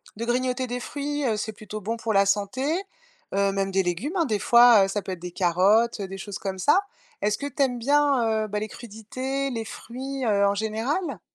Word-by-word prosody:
de 230 - -5
grignoter 255 +1 0
des 245 0 -4
fruits, 290 +1 -3
heu. 220 -3 +1
C'est 210 +1 -3
plutôt 215 0 -8
bon 225 +4 -3
pour 225 -1 -2
la 195 0 +5
santé, 205 +6 0 0.7
heu 200 0 +2
même 195 0 -1
des 190 0 +2
légumes, 195 - -2
hein, 340 - +3
des 215 -8 -1
fois, 235 -4 +7
heu, - - -3
ça 205 +1 -2
peut 190 - -6
être 180 - -5
des 180 0 -7
carottes, 195 +6 +3
heu, 195 - -3
des 195 +1 -7
choses 205 +1 -6
comme 190 -1 -4
ça. 295 - +4 0.4
Est-ce 210 0 +1
que 285 - -4
tu 285 +1 -4
aimes 250 -2 -1
bien, 250 -5 +2
heu, - - -6
ben, 210 0 -2
les 215 0 -4
crudités, 255 +5 -4
les 225 -3 -4
fruits, 265 +5 -6
heu, 200 -3 +3
en 200 - +1
général? 225 - -2
220 Hz, 230 wpm, -25 LUFS, 200-255 Hz, 0.7 s, fois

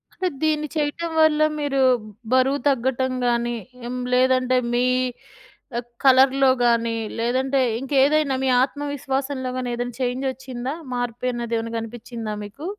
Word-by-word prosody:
అంటే 370 - -1 0.2
దీన్ని 305 -1 +1
చేయటం 310 +2 -1
వల్ల 310 -1 +4 0.2
మీరు 285 -2 -1 0.5
బరువు 265 +2 +3
తగ్గటం 260 0 0 0.2
గాని, 240 0 +1 0.6
లేదంటే 255 0 +3 0.2
మీ 245 +1 +2 1.2
కలర్‌లో 265 0 +5 0.2
గానీ, 230 -1 +2 0.2
లేదంటే 260 +4 +1 0.2
ఇంకేదైనా 275 +2 +2
మీ 265 - +2
ఆత్మవిశ్వాసంలో 275 -2 -3
గాని 250 -1 -2
ఏదైనా 245 0 -4
చేంజ్ 255 +2 -1
వచ్చిందా? 260 +1 -6 0.2
మార్పు 245 0 -2
అన్నది 235 -1 -3
ఏమైనా 230 0 -5
గనిపించిందా 225 -1 -6
మీకు? 215 +10 -10
260 Hz, 115 wpm, -23 LUFS, 240-275 Hz, 1.2 s, కలర్‌లో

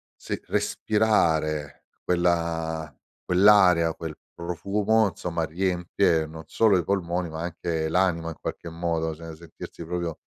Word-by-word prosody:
se - - -5
respirare 80 -9 +1 0.2
quella 85 -3 0 0.3
quell'area, 90 -3 +5
quel 80 -2 -6 0.2
profumo, 100 +5 +1
insomma 85 -2 -3
riempie, 90 -1 +1
non 80 +1 -9
solo 105 +1 +3
i 90 - 0
polmoni, 90 -2 -1
ma 80 - -6
anche 85 -2 -2
l'anima 85 -1 +1
in 80 - -7
qualche 85 - -5
modo, 80 -1 -2
cioè 80 0 -9
sentirsi 85 0 -10
proprio 85 -2 -3
85 Hz, 120 wpm, -26 LUFS, 80-90 Hz, 0.3 s, quell'area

